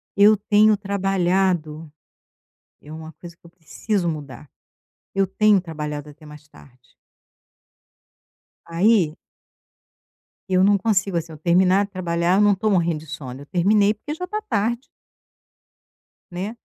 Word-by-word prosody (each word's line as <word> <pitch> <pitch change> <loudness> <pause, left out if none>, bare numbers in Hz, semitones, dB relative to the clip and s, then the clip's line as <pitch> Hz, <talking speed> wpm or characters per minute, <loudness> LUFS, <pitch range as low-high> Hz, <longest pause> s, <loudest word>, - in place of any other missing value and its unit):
Eu 210 +2 +6
tenho 210 +1 +3
trabalhado 185 -5 -1 0.9
é 150 - -12
uma 160 0 -9
coisa 170 -1 -13
que - - -62
eu 170 - -15
preciso 175 +3 -3
mudar. 145 -3 -7 0.7
Eu 195 0 +2
tenho 210 +1 +3
trabalhado 150 -3 -6
até 150 +1 -16
mais 150 0 -14
tarde. 130 -4 -20 1.8
Aí 170 -1 +2 1.3
eu 185 0 +3
não 200 +1 +4
consigo, 195 -3 0
assim, 165 0 -4
eu - - -11
terminar 185 +4 +3
de 200 - -19
trabalhar, 175 -1 0
eu - - +4
não 205 -1 +4
tô 215 +3 -1
morrendo 170 -5 +1
de 155 - -14
sono, 130 -2 -8
eu - - -11
terminei 200 +5 +2
porque 255 +8 -7
já 360 +4 -5
tá 425 +4 -4
tarde. 230 - -2 1.5
Né. 195 +6 -5
185 Hz, 135 wpm, -22 LUFS, 160-205 Hz, 1.8 s, Eu